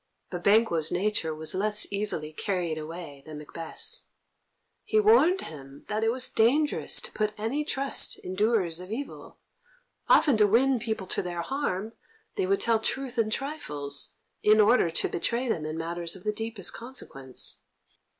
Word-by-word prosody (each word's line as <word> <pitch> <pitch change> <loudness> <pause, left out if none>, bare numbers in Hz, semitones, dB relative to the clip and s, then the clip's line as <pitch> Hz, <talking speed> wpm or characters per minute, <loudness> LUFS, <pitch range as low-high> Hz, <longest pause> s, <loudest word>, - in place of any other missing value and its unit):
But 175 -1 -5
Banquo's 200 -7 +4
nature 180 -5 0
was 155 0 -1
less 210 +2 +1
easily 185 -7 0
carried 175 -3 -2
away 155 -2 -8
than 155 0 -9
Macbeth's. 160 +2 -5 0.8
He 435 - +2
warned 415 -4 +5
him 140 -2 -10
that 215 +1 -1
it 225 - +3
was 255 +1 -2
dangerous 285 +7 +3
to - - -7
put 215 0 -1
any 230 +8 -1
trust 275 -2 0
in 185 - -7
doers 195 -5 +2
of 185 +2 -9
evil; 275 +5 -6 0.7
often 285 -7 +6
to 210 -1 +5
win 250 +4 +4
people 220 -4 -3
to - - -1
their 175 -1 -4
harm 225 -6 -2 0.4
they 385 -2 0
would 395 0 +2
tell 230 -1 +3
truth 255 +2 -2
in 220 -1 +2
trifles, 150 - -3 0.3
in 215 +1 +5
order 210 -4 +5
to 165 - +1
betray 235 +8 -1
them 160 -9 -1
in 155 +1 -4
matters 170 +1 -3
of 185 - -12
the 210 - 0
deepest 225 -3 -2
consequence. 135 - -5
210 Hz, 160 wpm, -28 LUFS, 165-240 Hz, 0.8 s, often